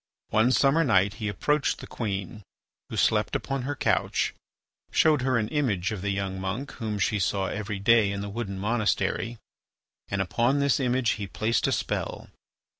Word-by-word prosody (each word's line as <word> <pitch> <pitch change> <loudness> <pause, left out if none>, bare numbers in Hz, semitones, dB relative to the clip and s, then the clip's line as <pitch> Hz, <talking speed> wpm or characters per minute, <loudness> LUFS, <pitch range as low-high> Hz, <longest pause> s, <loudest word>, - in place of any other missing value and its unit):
One 110 +3 +3
summer 135 +7 +4
night 100 - +3
he 105 - -1
approached 140 +8 0
the - - -9
queen, 100 -2 -4 0.5
who - - -5
slept - - +2
upon 135 -1 -2
her 145 +3 -3
couch, - - +1 0.6
showed 155 -4 +4
her 130 -1 +2
an 105 -2 0
image 115 - 0
of 105 -4 -4
the 100 - -2
young 95 -1 -2
monk 105 +9 -3
whom 110 -3 -4
she 105 +1 +1
saw 95 +2 0
every 105 +1 -3
day 105 0 +4
in 100 0 -3
the 100 - -4
wooden 100 -2 -4
monastery, 115 +2 0 0.7
and 100 - -2
upon 120 +8 +1
this 140 -1 +2
image 125 -2 +1
he 100 - -3
placed 110 +5 0
a - - +1
spell. - - -3
110 Hz, 175 wpm, -27 LUFS, 100-130 Hz, 0.7 s, summer